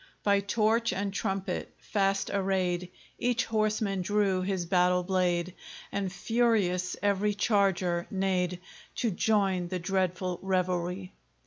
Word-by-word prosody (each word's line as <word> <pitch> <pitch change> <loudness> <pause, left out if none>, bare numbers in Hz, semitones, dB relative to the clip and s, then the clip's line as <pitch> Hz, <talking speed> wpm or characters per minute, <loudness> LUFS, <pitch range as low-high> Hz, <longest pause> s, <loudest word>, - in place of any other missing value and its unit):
By 200 -1 +4
torch 220 +3 +1
and 195 +1 -2
trumpet 195 -3 -3
fast 195 -1 0
arrayed, 185 -2 0 0.3
Each 245 -1 +1
horseman 215 -3 0
drew 195 -1 +1
his 185 -2 -1
battle 180 0 +3
blade, 180 -1 0 0.4
And 195 -2 -2
furious 195 -3 +1
every 205 +1 +2
charger 195 -5 +1
neighed, 185 -2 0 0.3
To 235 -3 0
join 195 -2 +1
the 185 +1 -3
dreadful 185 0 -1
revelry. 185 0 -1
190 Hz, 115 wpm, -29 LUFS, 180-205 Hz, 0.4 s, By